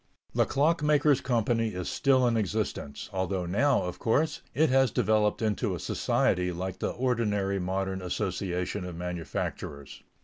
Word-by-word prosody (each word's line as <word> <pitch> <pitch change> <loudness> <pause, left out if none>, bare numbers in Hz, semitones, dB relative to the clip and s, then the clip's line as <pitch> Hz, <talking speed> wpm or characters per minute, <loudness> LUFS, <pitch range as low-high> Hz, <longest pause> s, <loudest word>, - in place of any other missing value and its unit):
The - - +2
Clock 150 +4 +2
makers' 150 -2 +3
Company 115 -3 0
is 90 -1 -4
still 130 -3 +3
in 120 -1 +2
existence; 105 -8 -2
although 95 -1 -1
now, 125 +10 +2
of 90 -1 -5
course, 145 +8 +1
it 155 -2 +3
has 135 -1 +4
developed 105 0 +1
into 105 -3 0
a - - -6
society 90 0 +1
like 90 +1 -5
the - - -1
ordinary 105 -6 0
modern 95 +1 -2
association 90 0 -2
of 90 -2 -6
manufacturers. 85 -4 -5
105 Hz, 145 wpm, -28 LUFS, 90-125 Hz, -, has